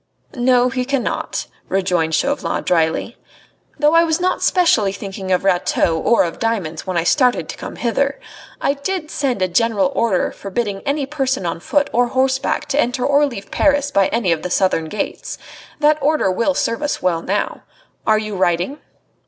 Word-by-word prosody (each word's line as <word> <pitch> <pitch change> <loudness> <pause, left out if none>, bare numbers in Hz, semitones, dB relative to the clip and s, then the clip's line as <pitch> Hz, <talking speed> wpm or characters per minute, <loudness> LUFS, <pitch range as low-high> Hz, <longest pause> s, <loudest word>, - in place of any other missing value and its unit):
"No, 250 -1 +3
he 255 0 -2
cannot," 270 -1 -2 0.2
rejoined 180 -4 +1
Chauvelin 275 - -1
dryly. 165 +6 0 0.6
"Though 300 +1 +3
I 335 0 +6
was 320 0 0
not 365 +1 0
specially 240 - +3
thinking 195 -1 -6
of 185 - +2
Rateau 175 -3 +2
or 235 - +3
of 170 -2 -4
diamonds 195 -9 -2
when 185 -2 -1
I 170 - +2
started 250 - +2
to - - -5
come - - -7
hither. 275 +4 -1 0.4
I 280 - +1
did 310 +3 -4
send 255 -9 -1
a - - +2
general 225 +6 +1
order 215 -6 +1
forbidding 200 0 -4
any 280 0 0
person 270 -7 -1
on 165 -1 -2
foot 285 - +1
or 245 +1 +3
horseback 265 +4 0
to 280 - +1
enter 245 +1 -1
or 285 +1 +4
leave 200 -7 -8
Paris 285 -1 +2
by 200 -7 +3
any 225 -7 0
of 165 - 0
the 180 - -4
southern 180 -3 +1
gates. 200 +6 -4 0.4
That 300 0 +3
order 295 -8 +2
will 230 +9 0
serve 230 -1 -1
us 295 -1 -2
well 170 -3 +1
now. 200 +4 -2 0.5
Are 215 - +5
you 215 -1 -4
riding?" 180 - 0
235 Hz, 175 wpm, -19 LUFS, 190-280 Hz, 0.6 s, I